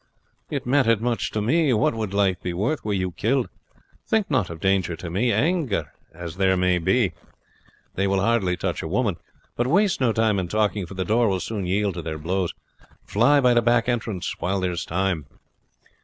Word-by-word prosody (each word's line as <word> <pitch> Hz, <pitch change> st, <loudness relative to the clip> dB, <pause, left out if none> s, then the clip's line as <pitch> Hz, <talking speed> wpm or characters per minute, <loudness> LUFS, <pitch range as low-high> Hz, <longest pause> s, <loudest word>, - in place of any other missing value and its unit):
"But -, -, -4 dB
it -, -, -3 dB
mattered 125 Hz, -4 st, +3 dB
much 120 Hz, +1 st, -1 dB
to 105 Hz, -, -2 dB
me. 155 Hz, +5 st, +2 dB
What 105 Hz, -, +2 dB
would 110 Hz, -3 st, -3 dB
life 100 Hz, -3 st, +1 dB
be 90 Hz, -, -3 dB
worth 110 Hz, -, -1 dB
were 105 Hz, -, -2 dB
you 95 Hz, -1 st, -1 dB
killed? 120 Hz, +8 st, 0 dB, 0.6 s
Think 220 Hz, -6 st, +1 dB
not 120 Hz, -, +1 dB
of 85 Hz, -1 st, -7 dB
danger 95 Hz, -2 st, +1 dB
to 85 Hz, +1 st, -7 dB
me. 115 Hz, +7 st, +1 dB
Angry 150 Hz, -, +1 dB, 0.3 s
as 85 Hz, +1 st, -8 dB
they 95 Hz, -1 st, +3 dB
may 90 Hz, -1 st, +2 dB
be, 100 Hz, +3 st, +2 dB, 0.8 s
they 100 Hz, +1 st, 0 dB
will 95 Hz, 0 st, +1 dB
hardly 100 Hz, -4 st, +1 dB
touch 90 Hz, -1 st, -2 dB
a -, -, -4 dB
woman. 100 Hz, 0 st, 0 dB, 0.4 s
But 120 Hz, -, 0 dB
waste 190 Hz, +2 st, +2 dB
no 125 Hz, -3 st, +3 dB
time 110 Hz, -2 st, +2 dB
in 90 Hz, -, -2 dB
talking, 105 Hz, -1 st, 0 dB
for 100 Hz, -, -10 dB
the 95 Hz, 0 st, -2 dB
door 115 Hz, +2 st, +2 dB
will 95 Hz, -1 st, 0 dB
soon 100 Hz, -2 st, -4 dB
yield 100 Hz, +1 st, 0 dB
to 85 Hz, -, -5 dB
their 80 Hz, -1 st, -5 dB
blows. 90 Hz, +3 st, -1 dB, 0.5 s
Fly 125 Hz, +8 st, +4 dB
by 125 Hz, -2 st, +4 dB
the 120 Hz, -, +4 dB
back 120 Hz, 0 st, +2 dB
entrance, 110 Hz, -7 st, -2 dB
while 95 Hz, +2 st, -1 dB
there 90 Hz, -1 st, 0 dB
is 85 Hz, -1 st, -4 dB
time." 85 Hz, -4 st, -1 dB
100 Hz, 205 wpm, -24 LUFS, 90-120 Hz, 0.8 s, Fly